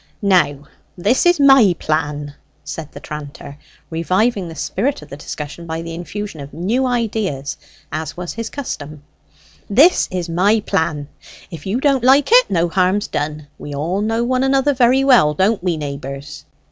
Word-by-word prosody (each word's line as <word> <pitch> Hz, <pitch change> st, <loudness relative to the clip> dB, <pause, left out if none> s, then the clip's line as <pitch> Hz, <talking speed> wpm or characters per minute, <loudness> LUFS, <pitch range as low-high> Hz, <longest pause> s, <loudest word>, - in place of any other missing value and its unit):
"Now, 155 Hz, -8 st, +2 dB, 0.3 s
this 220 Hz, -, +2 dB
is 350 Hz, -3 st, +4 dB
my 270 Hz, -10 st, +6 dB
plan," 150 Hz, -2 st, -2 dB, 0.3 s
said 150 Hz, +1 st, -7 dB
the -, -, -10 dB
tranter, 145 Hz, -1 st, -9 dB, 0.3 s
reviving 185 Hz, +5 st, 0 dB
the 165 Hz, -, -9 dB
spirit 205 Hz, -, -2 dB
of 150 Hz, -, -15 dB
the -, -, -7 dB
discussion 150 Hz, +3 st, -7 dB
by 160 Hz, 0 st, -4 dB
the 165 Hz, 0 st, -6 dB
infusion 175 Hz, +1 st, -6 dB
of 140 Hz, 0 st, -9 dB
new 225 Hz, +11 st, 0 dB
ideas, 215 Hz, -, -2 dB, 0.4 s
as 155 Hz, +1 st, -5 dB
was 175 Hz, -1 st, -5 dB
his 230 Hz, 0 st, -5 dB
custom 150 Hz, -, -6 dB, 0.7 s
"this 285 Hz, -, +5 dB
is 180 Hz, -2 st, -3 dB
my 190 Hz, +6 st, +2 dB
plan; 160 Hz, -8 st, -1 dB, 0.4 s
if 165 Hz, 0 st, -8 dB
you 215 Hz, +6 st, 0 dB
don't 270 Hz, -3 st, +2 dB
like 270 Hz, -, +4 dB
it, -, -, +6 dB
no 170 Hz, -1 st, +1 dB
harm's 185 Hz, +4 st, +1 dB
done. 150 Hz, 0 st, -3 dB
We 145 Hz, -1 st, -7 dB
all 170 Hz, +8 st, -1 dB
know 225 Hz, +2 st, 0 dB
one 255 Hz, +1 st, +1 dB
another 270 Hz, +1 st, +2 dB
very 255 Hz, +1 st, +3 dB
well, 235 Hz, -, +5 dB
don't 195 Hz, +3 st, +1 dB
we, 175 Hz, -3 st, 0 dB
neighbours?" 140 Hz, -1 st, -7 dB
180 Hz, 165 wpm, -19 LUFS, 150-235 Hz, 0.7 s, my